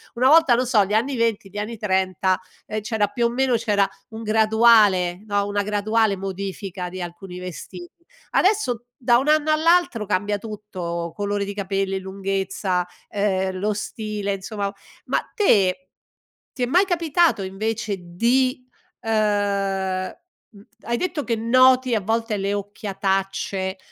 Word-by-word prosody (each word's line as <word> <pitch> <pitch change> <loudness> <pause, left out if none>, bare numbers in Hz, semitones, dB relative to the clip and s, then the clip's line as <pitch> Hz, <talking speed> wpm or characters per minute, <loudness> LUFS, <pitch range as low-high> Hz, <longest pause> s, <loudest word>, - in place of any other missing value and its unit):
una 250 +2 +3
volta 315 -4 +6
lo 250 - +1
so 220 -5 +3
gli 205 - -4
anni 260 +5 +1
20 225 -4 0
gli 205 - -10
anni 215 +3 -4
30 190 -2 +1 0.3
ehm, 215 0 -3
c'era 215 -1 0
più 235 +3 -1
o - - -2
meno 255 0 +1
c'era 205 -4 +2 0.2
un 225 0 -8
graduale 215 -4 +4
no, 205 -1 +1
una 205 0 0
graduale 210 0 +1
modifica 190 -1 -5
di 185 +1 -8
alcuni 180 +1 -8
vestiti, 180 - -9 0.3
adesso 365 - +1
da 240 -1 +4
un 270 - -1
anno 310 0 +3
all'altro 315 -8 +3
cambia 205 +1 0
tutto: 180 -6 -5
colore 205 0 -1
di 200 - -5
capelli, 195 -1 -2
lunghezza, 190 -1 -2 0.2
ehm, 190 -2 0
lo 210 +2 0
stile 210 -1 -3
insomma 200 +1 -4 0.3
ma - - +1 0.2
te 185 - +3 0.7
ti 255 - -3
è - - +4
mai 360 +9 +4
capitato 335 - +2
invece 210 +2 -3
di 250 +9 0 0.3
ehm, 200 -4 0 0.4
mh, 205 -4 -17 0.2
hai 235 +1 -1
detto 345 -1 -2
che 235 - -1
noti 255 +2 +4
a 215 - 0
volte 225 +2 -1
le 195 +1 -1
occhiatacce, 195 -1 -2
205 Hz, 145 wpm, -22 LUFS, 195-235 Hz, 0.7 s, volta